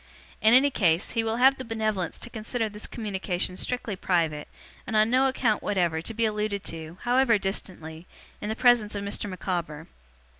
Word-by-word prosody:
In 220 +2 +6
any 280 +2 +5
case, 170 -7 +1
he 230 -1 0
will 225 0 -1
have 265 +3 +4
the - - -4
benevolence 215 -6 -2
to 235 - -8
consider 225 +1 -2
this 210 0 -8
communication 190 -5 -2
strictly 245 +1 -2
private, 165 -5 0 0.4
and 225 - -3
on 215 +1 +4
no 260 +2 +4
account 245 -5 +1
whatever 175 -5 0
to 225 - -6
be 230 +1 +1
alluded 210 -2 -1
to, 160 +1 -8
however 245 -2 +4
distantly, 180 -4 -4 0.3
in 210 - -4
the 220 - -1
presence 240 -4 +3
of 200 - -3
Mr. 200 0 -3
Micawber. 170 -4 -4
210 Hz, 180 wpm, -26 LUFS, 180-230 Hz, 0.4 s, In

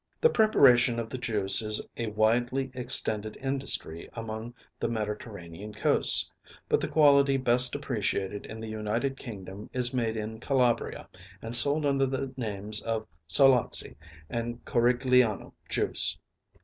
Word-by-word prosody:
The 475 - +1
preparation 125 - +2
of 115 -1 -7
the 130 - -7
juice 105 -3 +4
is 110 -1 +1 0.2
a 115 - -6
widely 120 +5 -3
extended 110 -4 +3
industry 135 -11 0
along 115 +1 -9 0.2
the - - -4
Mediterranean 105 -3 -9
coasts; - - +2 0.4
but - - -1
the - - -4
quality 140 -3 +1
best 125 0 +5
appreciated 105 -7 -5
in 110 - -11
the 110 - -9
United 110 +5 -5
Kingdom 100 -5 -12
is 125 0 +1
made 115 -3 -4
in 110 +1 -8
Calabria, 125 -2 -3 0.3
and 115 +3 +1
sold 145 +4 +8
under 135 -1 -1
the 135 0 -7
names 105 -3 +1
of 110 -1 -6 0.2
Solazzi 125 - +3 0.3
and 120 +3 -8
Corigliano 125 -2 -1 0.2
juice. - - 0
120 Hz, 135 wpm, -25 LUFS, 110-130 Hz, 0.4 s, sold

